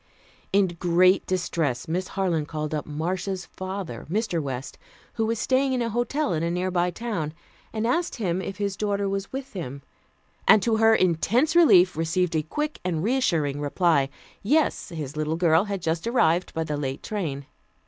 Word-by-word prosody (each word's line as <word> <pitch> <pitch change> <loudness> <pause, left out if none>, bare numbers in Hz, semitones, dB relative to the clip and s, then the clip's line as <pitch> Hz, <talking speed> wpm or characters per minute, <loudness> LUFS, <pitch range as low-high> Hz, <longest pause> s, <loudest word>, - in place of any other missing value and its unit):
In 200 0 +4
great 180 +2 +4
distress 165 -8 -1
Miss 180 +3 -2
Harland 170 -6 0
called 155 -1 -4
up 150 - -3
Marcia's 180 +5 -3
father, 185 -9 -6
Mr. 195 -3 0
West, 135 -2 -5 0.3
who 225 -1 0
was 230 +1 0
staying 265 +4 +1
in 250 - 0
a 230 - -2
hotel 240 0 0
in 155 - -1
a 170 - 0
nearby 180 0 0
town, 175 -6 -4 0.4
and 220 0 -2
asked 335 +9 0
him 190 -6 -1
if 190 +1 -6
his 200 -1 -2
daughter 200 0 -1
was 195 0 -3
with 270 0 -6
him, 140 -7 -6 0.6
and 210 - +7
to 225 -2 +2
her 225 0 +5
intense 220 - +2
relief, 190 - +6
received 165 +2 0
a 155 - +2
quick 300 - -3
and 170 -3 -1
reassuring 165 - +1
reply. 145 -2 +2 0.3
Yes, 295 +4 +1
his 155 -5 -6
little 155 +1 -1
girl 170 +1 +4
had 200 -3 -4
just 165 +4 -1
arrived 180 -7 +2
by 160 - 0
the 150 -2 -3
late 135 -1 -4
train. 155 -10 -3
180 Hz, 175 wpm, -25 LUFS, 160-215 Hz, 0.6 s, and